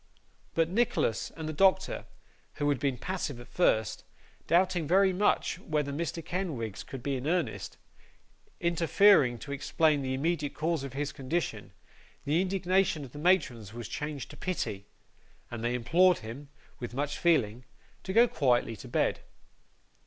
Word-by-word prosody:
But, 165 Hz, -1 st, +3 dB
Nicholas 185 Hz, -, 0 dB
and 160 Hz, -1 st, -5 dB
the 155 Hz, -, -3 dB
doctor 190 Hz, +4 st, +2 dB, 0.5 s
who 145 Hz, -1 st, -1 dB
had 140 Hz, -3 st, +1 dB
been 140 Hz, -3 st, 0 dB
passive 175 Hz, -8 st, -4 dB
at 120 Hz, -, -11 dB
first, 110 Hz, -, +1 dB, 0.4 s
doubting 175 Hz, -2 st, +2 dB
very 190 Hz, +3 st, +4 dB
much 205 Hz, +3 st, +1 dB
whether 150 Hz, -2 st, -1 dB
Mr. 165 Hz, +1 st, -3 dB
Kenwigs 145 Hz, -, -3 dB
could 130 Hz, -3 st, -8 dB
be 140 Hz, -1 st, -1 dB
in 130 Hz, +3 st, -5 dB
earnest 175 Hz, 0 st, -1 dB, 0.8 s
interfering 170 Hz, -5 st, +4 dB
to 140 Hz, -, -9 dB
explain 145 Hz, +1 st, +1 dB
the 130 Hz, -1 st, -2 dB
immediate 150 Hz, +1 st, -1 dB
cause 160 Hz, -2 st, -1 dB
of 135 Hz, -2 st, -6 dB
his 145 Hz, +1 st, -2 dB
condition, 150 Hz, +5 st, -3 dB, 0.5 s
the 155 Hz, +5 st, +2 dB
indignation 185 Hz, -4 st, +1 dB
of 125 Hz, -, -13 dB
the 145 Hz, -, -9 dB
matrons 145 Hz, -, +1 dB
was 120 Hz, -2 st, -6 dB
changed 150 Hz, -3 st, -5 dB
to -, -, -12 dB
pity, 100 Hz, -, -3 dB, 0.6 s
and 115 Hz, -1 st, -5 dB
they 120 Hz, +1 st, 0 dB
implored 175 Hz, +9 st, +4 dB
him, 135 Hz, +6 st, -8 dB, 0.3 s
with 120 Hz, -1 st, -6 dB
much 145 Hz, +1 st, -2 dB
feeling, 125 Hz, -9 st, +2 dB, 0.4 s
to 190 Hz, -, -5 dB
go 230 Hz, +5 st, +6 dB
quietly 125 Hz, -, +1 dB
to -, -, -10 dB
bed. -, -, 0 dB
150 Hz, 155 wpm, -29 LUFS, 130-175 Hz, 0.8 s, go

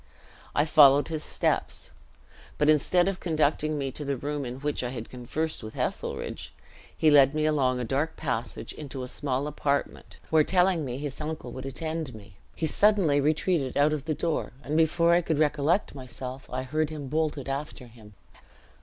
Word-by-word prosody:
I 145 Hz, -, +3 dB
followed 145 Hz, -2 st, +6 dB
his 155 Hz, -2 st, -3 dB
steps; -, -, -1 dB, 0.7 s
but 150 Hz, 0 st, +3 dB
instead 175 Hz, +4 st, +3 dB
of 195 Hz, -1 st, -1 dB
conducting 155 Hz, -2 st, +1 dB
me 135 Hz, -2 st, -2 dB
to 150 Hz, -, -7 dB
the 140 Hz, -1 st, -2 dB
room 145 Hz, +1 st, -3 dB
in 125 Hz, 0 st, -5 dB
which 145 Hz, -2 st, -1 dB
I 125 Hz, -, -2 dB
had 120 Hz, -3 st, -7 dB
conversed 130 Hz, +6 st, -3 dB
with 110 Hz, -1 st, -9 dB
Heselrigge, -, -, -4 dB, 0.4 s
he 155 Hz, -, +4 dB
led 140 Hz, 0 st, +6 dB
me 155 Hz, 0 st, +1 dB
along 135 Hz, -5 st, +2 dB
a -, -, -2 dB
dark 140 Hz, +7 st, -1 dB
passage 125 Hz, -6 st, -4 dB
into 135 Hz, -3 st, -7 dB
a -, -, -5 dB
small 135 Hz, +1 st, -1 dB
apartment, 145 Hz, -1 st, -2 dB
where 160 Hz, -1 st, +5 dB
telling 180 Hz, -1 st, +2 dB
me 125 Hz, -1 st, -4 dB
his 145 Hz, +1 st, -5 dB
uncle 150 Hz, -5 st, -5 dB
would 130 Hz, +2 st, -6 dB
attend 155 Hz, -1 st, -4 dB
me, 100 Hz, -2 st, -14 dB, 0.2 s
he 160 Hz, -, -2 dB
suddenly 175 Hz, -5 st, +3 dB
retreated 155 Hz, -1 st, 0 dB
out 145 Hz, +2 st, +4 dB
of 145 Hz, -2 st, -3 dB
the 155 Hz, -1 st, -1 dB
door, 165 Hz, 0 st, -2 dB
and 150 Hz, -, -3 dB
before 170 Hz, +1 st, +4 dB
I 175 Hz, -, +4 dB
could 160 Hz, -3 st, -1 dB
recollect 155 Hz, +5 st, +1 dB
myself 130 Hz, 0 st, -8 dB
I 130 Hz, +1 st, -3 dB
heard 155 Hz, +4 st, -1 dB
him 150 Hz, -3 st, -6 dB
bolt 155 Hz, +2 st, 0 dB
it 135 Hz, -, -6 dB
after 135 Hz, -1 st, -4 dB
him. 110 Hz, -3 st, -16 dB
145 Hz, 185 wpm, -27 LUFS, 130-155 Hz, 0.7 s, followed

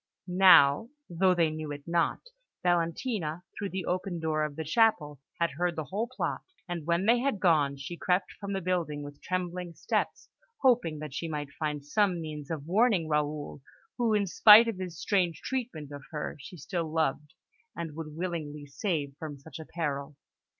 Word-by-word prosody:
Now, 180 Hz, 0 st, +6 dB, 0.2 s
though 185 Hz, +2 st, +3 dB
they 165 Hz, -2 st, +2 dB
knew 155 Hz, -1 st, -5 dB
it 145 Hz, 0 st, -7 dB
not, 170 Hz, 0 st, +1 dB, 0.4 s
Valentina, 175 Hz, 0 st, 0 dB
through 200 Hz, -, -3 dB
the 190 Hz, -2 st, -4 dB
open 180 Hz, -1 st, -2 dB
door 155 Hz, -1 st, 0 dB
of 150 Hz, -1 st, -3 dB
the 160 Hz, -, -3 dB
chapel, 155 Hz, -, +2 dB, 0.2 s
had 170 Hz, 0 st, +1 dB
heard 175 Hz, +5 st, -1 dB
the 155 Hz, -, -2 dB
whole 200 Hz, -, -3 dB
plot; 255 Hz, -, -3 dB, 0.3 s
and 170 Hz, -3 st, -5 dB
when 170 Hz, +3 st, +2 dB
they 235 Hz, +2 st, +5 dB
had 260 Hz, -5 st, 0 dB
gone, 150 Hz, -6 st, +3 dB
she 140 Hz, +6 st, -7 dB
crept 180 Hz, +2 st, 0 dB
from 200 Hz, -1 st, -4 dB
the 195 Hz, -, -2 dB
building 165 Hz, -5 st, -1 dB
with 145 Hz, 0 st, -10 dB
trembling 180 Hz, -1 st, -3 dB
steps, -, -, -2 dB, 0.4 s
hoping 235 Hz, -, +3 dB
that 150 Hz, -2 st, -7 dB
she 165 Hz, -, -3 dB
might 150 Hz, -3 st, -4 dB
find 150 Hz, -2 st, -3 dB
some 185 Hz, +2 st, +2 dB
means 150 Hz, -3 st, -6 dB
of 150 Hz, -3 st, -4 dB
warning 195 Hz, -1 st, +3 dB
Raoul, 150 Hz, -1 st, -2 dB, 0.4 s
who, 230 Hz, -3 st, +3 dB
in 205 Hz, -1 st, +2 dB
spite 210 Hz, +6 st, +8 dB
of 220 Hz, -5 st, -3 dB
his 180 Hz, -4 st, -6 dB
strange 180 Hz, -5 st, +1 dB
treatment 235 Hz, -, -4 dB
of 145 Hz, 0 st, -7 dB
her, 150 Hz, -2 st, -4 dB
she 175 Hz, +6 st, -10 dB
still 165 Hz, +1 st, -3 dB
loved, 150 Hz, -2 st, -1 dB, 0.4 s
and 165 Hz, -3 st, -5 dB
would 155 Hz, -2 st, -7 dB
willingly 155 Hz, -5 st, -4 dB
save 145 Hz, -2 st, -2 dB
from 155 Hz, -4 st, -6 dB
such 145 Hz, +2 st, -11 dB
a 160 Hz, -, -8 dB
peril. 145 Hz, -3 st, -3 dB
165 Hz, 180 wpm, -29 LUFS, 150-185 Hz, 0.4 s, spite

